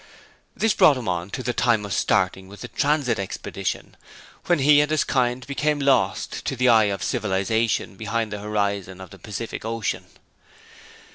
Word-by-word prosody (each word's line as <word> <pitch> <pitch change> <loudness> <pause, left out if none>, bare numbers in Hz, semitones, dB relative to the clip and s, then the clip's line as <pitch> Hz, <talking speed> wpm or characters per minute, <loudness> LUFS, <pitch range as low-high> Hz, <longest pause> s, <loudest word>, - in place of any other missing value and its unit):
This 225 -2 +2
brought 145 - +5
him 125 - -6
on 90 0 -2
to 130 - -5
the 120 0 -1
time 115 -4 +2
of 100 - -4
starting 95 -1 +1
with 100 +1 -13
the - - -6
Transit 140 -6 +1
expedition, 95 - -4 0.5
when 175 - +4
he 145 +1 +5
and 150 - 0
his 155 -1 +2
kind 125 -1 0
became 150 +2 0
lost 140 -1 +1
to - - -1
the 125 0 +3
eye 110 -2 +6
of 100 -1 -2
civilization 110 -2 0
behind 110 0 -2
the 105 - -4
horizon 100 -3 -2
of 95 -2 -10
the - - -13
Pacific 110 +1 -6
Ocean. 115 0 -3
115 Hz, 170 wpm, -23 LUFS, 100-130 Hz, 0.5 s, eye